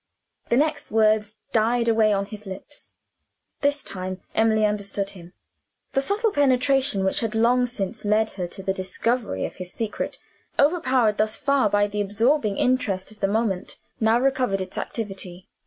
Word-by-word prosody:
The 235 - +3
next 300 +1 0
words 215 -1 +2 0.2
died 235 +1 +2
away 220 -2 +4
on 200 -1 +1
his 210 0 -10
lips. 195 +10 -10 0.6
This 285 0 +1
time, 185 0 -5
Emily 220 -1 +3
understood 200 -1 -2
him. 175 -1 -13 0.6
The 270 - +2
subtle 415 - 0
penetration 270 - +2
which 190 - +1
had 225 -1 -2
long 245 +2 +3
since 210 -6 -4
led 215 +1 +2
her 180 -3 -4
to 195 +2 -8
the 190 - 0
discovery 190 - -1
of - - -7
his 180 -1 -7
secret 225 -2 -4 0.4
overpowered, 260 -8 +3
thus 215 0 +1
far, 275 -5 +2
by 205 0 +3
the 205 0 -2
absorbing 215 +2 +1
interest 215 -7 0
of 215 - -17
the 195 - +1
moment 205 -3 -1 0.2
now 225 +1 +3
recovered 255 -6 +1
its 185 0 -6
activity. 190 -5 -6
215 Hz, 160 wpm, -24 LUFS, 195-250 Hz, 0.6 s, away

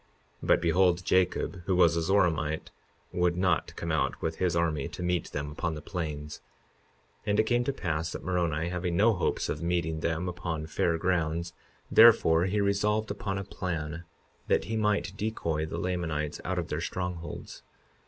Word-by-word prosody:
But - - +3
behold, 90 +1 +3
Jacob, 90 0 +1
who 95 - +1
was 85 -2 +5
a 85 - +1
Zoramite, 80 -4 +1 0.4
would 90 0 +1
not 90 -3 +1
come - - -3
out - - 0
with 80 0 -3
his 90 -3 +1
army 80 -3 0
to 85 +1 -7
meet 90 -1 0
them 75 0 -4
upon 80 +2 -2
the - - -5
plains. 75 -4 -5 0.9
52:21 - - 0
And 105 +1 +2
it - - +6
came 120 +2 +1
to 140 - +1
pass 80 - -2
that - - -6
Moroni, 85 -3 0
having 90 -1 -2
no 110 +4 +5
hopes 90 - -1
of - - -3
meeting 85 -2 0
them 85 +2 -1
upon 85 -3 -3
fair 80 +1 0
grounds, 85 -1 0 0.4
therefore, 90 -8 +7
he 100 +2 0
resolved 105 +2 +1
upon 100 -4 -3
a 95 - -3
plan 85 -4 -4 0.4
that - - +2
he 110 - -3
might 105 -3 +1
decoy 85 -8 -2
the - - -5
Lamanites 80 -5 -2
out - - -2
of - - -2
their - - -2
strongholds. 90 -2 -5
85 Hz, 175 wpm, -29 LUFS, 80-95 Hz, 0.9 s, therefore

